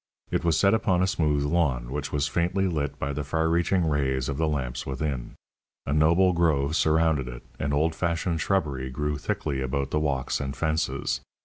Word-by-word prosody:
It - - 0
was 85 -2 +2
set 100 +1 +4
upon 95 -5 +2
a - - +4
smooth 75 -6 +1
lawn, 70 -7 0
which 75 +1 -3
was 75 0 0
faintly 90 +4 0
lit 75 -5 -2
by 70 +1 -2
the 75 +1 -3
far 80 +3 0
reaching 85 +1 +2
rays 65 -4 0
of 70 - -2
the 80 0 +1
lamps 65 -5 -2
within. 65 -2 -4 0.5
A 70 - -1
noble 85 +5 +4
grove 80 -4 +2
surrounded 80 -4 +2
it, - - -8 0.2
and 70 - -1
old 80 +3 +2
fashioned 85 0 -1
shrubbery 70 -10 0
grew 75 +3 -2
thickly 70 -2 -2
about 70 +1 -2
the 75 - +1
walks 70 -4 -1
and 70 0 -4
fences. 80 +2 -1
75 Hz, 190 wpm, -26 LUFS, 70-85 Hz, 0.5 s, set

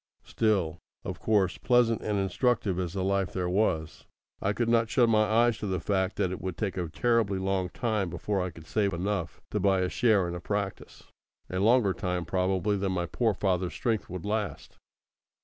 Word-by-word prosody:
Still, 100 -8 0 0.3
of - - -5
course, 100 -5 +1
pleasant 120 -2 +3
and 105 -1 -1
instructive 100 0 0
as 90 -2 -3
the 95 -1 -2
life 95 -1 0
there 90 -1 -1
was, 90 -5 -1 0.3
I 95 - +1
could 115 +2 -1
not 115 -1 +3
shut 120 -1 +4
my 110 -1 +4
eyes 115 +2 +3
to 105 - -3
the 95 -1 -1
fact 95 -1 0
that 90 - 0
it 95 - -5
would 95 -4 -4
take 100 0 -2
a 90 -3 -3
terribly 115 0 +1
long 95 -1 -1
time 105 -3 -1
before 95 +4 -2
I 90 - -2
could 80 -2 -13
save 100 +2 0
enough 90 -1 -3
to - - 0
buy 95 -2 +3
a 90 - 0
share 105 -6 +3
in 85 - -4
a 90 - -4
practice 100 +1 -4 0.5
a 90 - -1
longer 110 -1 +4
time 90 0 -2
probably 95 +3 0
than 95 -1 -1
my 90 -1 -1
poor 110 +4 0
father's 90 -2 0
strength 115 -3 -1
would 90 0 -6
last. 105 0 -3
95 Hz, 200 wpm, -28 LUFS, 90-110 Hz, 0.5 s, shut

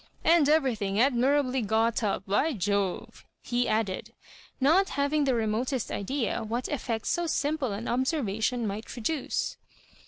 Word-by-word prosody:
« - - -33
And 325 -3 +5
everything 230 -10 +1
admirably 265 +1 +2
got 225 +2 +1
up, 200 -3 -1
by 275 +11 +1
Jove 200 -2 -2
I" - - -26
he 245 0 +1
add 215 0 +1
ed; 185 - -6 0.5
not 330 +9 +4
having 285 +1 +2
the 265 -2 +2
remotest 230 +3 -1
idea 235 +4 -2
what 235 +3 -3
effectso 290 +5 -2
simple 290 -5 0
an 205 +4 -5
observation 245 -3 0
might 210 +2 -4
produce. 260 +5 -2
245 Hz, 145 wpm, -28 LUFS, 215-285 Hz, 0.5 s, And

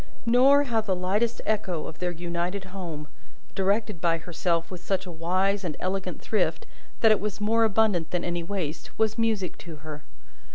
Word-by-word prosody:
Nor, 265 +4 +6
how 235 -5 +1
the 195 -3 0
lightest 200 +6 0
echo 190 -7 0
of 160 - -8
their 180 - 0
united 175 +3 -3
home, 165 -6 -5 0.5
directed 200 -1 0
by 165 -1 +3
herself 170 0 -1
with 180 -1 -7
such 190 -1 -1
a 180 - -6
wise 185 +4 +1
and 165 -5 -3
elegant 190 +1 -2
thrift - - 0 0.4
that 225 - +7
it 215 - +4
was 210 0 -3
more 225 +2 +3
abundant 205 -6 +2
than 180 -1 -1
any 175 0 -1
waste, 170 -4 -4
was 220 0 +1
music 220 -5 0
to 170 -2 -8
her. 150 -1 -7
185 Hz, 175 wpm, -27 LUFS, 170-215 Hz, 0.5 s, that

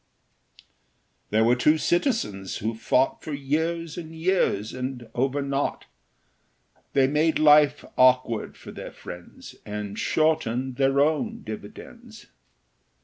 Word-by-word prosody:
There 110 +1 +3
were 120 +2 +4
two 150 +5 +3
citizens 155 - -1
who 110 +3 -2
fought 125 +4 +1
For 155 - -6
years 160 +4 -2
and 165 -1 -9
years, 160 - 0
and 125 -2 -5
over 135 +3 0
nought; 140 0 -2 1.1
They 135 -1 +4
made 150 +4 +2
life 150 -1 +5
awkward 130 -3 +3
for - - -11
their - - -8
friends, 90 0 -11
And 105 -1 -5
shortened 130 -5 0
their 135 0 +2
own 200 +10 0
dividends. 105 -1 -10
135 Hz, 115 wpm, -25 LUFS, 115-155 Hz, 1.1 s, life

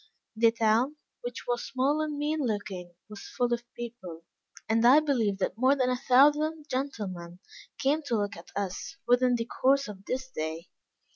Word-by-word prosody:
The 225 +1 +5
town, 230 +5 +2 0.3
which 245 -1 -6
was 240 -1 -1
small 275 +4 0
and 305 -1 -3
mean 300 +2 -1
looking, 205 - -3
was 210 -2 -10
full 245 -1 +2
of 240 - -1
people, 225 -9 -8 0.4
and 225 +1 +2
I 255 +5 +8
believe 240 -10 0
that 195 +2 -2
more 260 +3 +4
than 255 -2 +1
a - - +1
thousand 295 +4 +3
gentlemen 205 - -4 0.4
came 290 +4 +1
to 235 - +1
look 205 -1 -2
at 170 - -13
us 200 - -4
within 245 0 +4
the 230 -1 -2
course 275 +3 +2
of 195 -2 -9
this 260 +1 -3
day. 160 -2 -5
240 Hz, 170 wpm, -28 LUFS, 205-275 Hz, 0.4 s, I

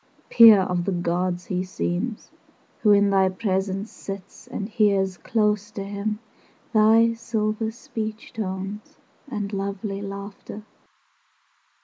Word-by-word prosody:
VI - - -22
Peer 225 -4 +10
of 180 -2 -1
the 195 - 0
gods 175 0 -1
he 185 -1 -2
seems, 185 +4 -3 0.5
Who 210 - +5
in 200 0 +5
thy 190 -1 +4
presence 195 +1 -2
Sits 195 -1 -9
and 200 - -4
hears 200 -4 +2
close 210 0 0
to 205 -2 -6
him 205 +2 -3 0.6
Thy 225 +1 +5
silver 220 -1 -2
speech 220 -1 -6
tones 195 0 -5 0.3
And 210 -4 -4
lovely 195 0 -3
laughter. 200 +1 -8
200 Hz, 120 wpm, -24 LUFS, 190-215 Hz, 0.6 s, Peer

